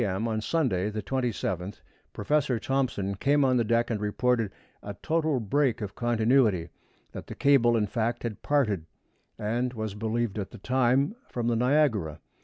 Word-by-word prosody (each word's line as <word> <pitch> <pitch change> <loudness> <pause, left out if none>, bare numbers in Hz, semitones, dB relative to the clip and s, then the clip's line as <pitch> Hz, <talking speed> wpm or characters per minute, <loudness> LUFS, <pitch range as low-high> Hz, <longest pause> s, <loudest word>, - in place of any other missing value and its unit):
M. 100 +2 -1
on 110 -1 -1
Sunday, 110 - 0
the 105 0 -5
27th, 105 -7 -3 0.3
Professor 145 -4 0
Thomson 120 -5 -1
came 140 +8 +2
on 130 -1 +3
deck 115 +1 +1
and 105 -2 -2
reported 115 0 0 0.3
a 100 -1 -7
total 160 -4 +1
break 120 +2 +1
of 105 -2 -5
continuity; 115 -6 +2 0.4
that - - -8
the - - -7
cable, 120 -4 +4
in 105 - +1
fact, 115 +2 -2
had 115 -3 -4
parted, 105 - 0 0.5
and 120 +4 -1
as - - -12
was 110 -2 -3
believed 110 0 -2
at 95 - -4
the 115 - -11
time, 130 - +1
from 120 -1 -3
the 120 - +1
Niagara. 115 - +1
115 Hz, 165 wpm, -27 LUFS, 105-130 Hz, 0.5 s, cable